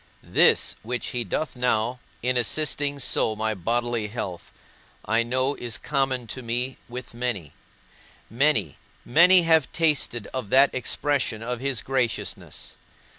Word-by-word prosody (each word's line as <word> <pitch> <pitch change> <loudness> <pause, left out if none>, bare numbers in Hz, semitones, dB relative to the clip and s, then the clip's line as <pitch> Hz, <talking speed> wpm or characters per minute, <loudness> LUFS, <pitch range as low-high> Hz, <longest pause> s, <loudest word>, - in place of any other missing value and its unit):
This - - +3
which 120 +2 -3
he 120 -1 -2
doth 130 - -3
now, 125 0 0 0.2
in 125 +1 +1
assisting 145 +3 +1
so 115 -4 +1
my 110 +1 -1
bodily 115 +3 -1
health, 100 -5 -6 0.5
I 115 +3 +2
know 130 +4 0
is 120 -5 -4
common 135 -4 0
to 120 +4 -6
me 125 +2 -2
with 125 0 -8
many: 115 - -3 0.7
many, 115 - +1 0.3
many 175 +6 +6
have 160 -4 +3
tasted 150 -8 0
of 130 -6 -4
that 135 +3 +5
expression 130 -3 -1
of 125 0 -3
his 135 -4 -2
graciousness. 130 -4 -2
125 Hz, 130 wpm, -25 LUFS, 115-135 Hz, 0.7 s, many